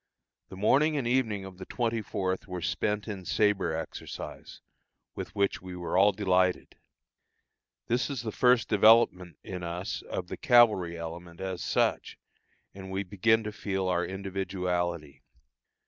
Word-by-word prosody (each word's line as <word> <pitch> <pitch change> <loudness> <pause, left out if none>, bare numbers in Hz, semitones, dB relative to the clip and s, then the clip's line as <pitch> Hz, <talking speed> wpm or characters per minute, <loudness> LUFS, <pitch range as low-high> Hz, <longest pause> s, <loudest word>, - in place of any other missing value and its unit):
The 95 - -10
morning 145 +9 +3
and 135 - -1
evening 115 -5 0
of 95 -1 -11
the 95 - -7
24th 110 -6 -2
were 90 -2 -5
spent 105 +4 -1
in 100 -4 -5
sabre 100 -4 +1
exercise, 80 -1 -7 0.5
with - - -7
which 100 -1 0
we 90 0 -8
were 90 0 -4
all 100 +3 +6
delighted. 95 -2 +1 1.1
This 125 +3 0
is 135 -5 -4
the 110 - -3
first 125 -1 +3
development 105 -5 +4
in 90 -1 -6
us 85 +2 -4
of 90 - -5
the - - -7
cavalry 105 -9 +4
element 85 +1 -8
as 95 -2 -4
such, - - 0 0.6
and 95 -1 -9
we 95 +1 -2
begin 110 +4 +2
to 105 - -4
feel 95 -2 -2
our 90 -1 +1
individuality. 90 -5 -3
95 Hz, 145 wpm, -29 LUFS, 90-110 Hz, 1.1 s, all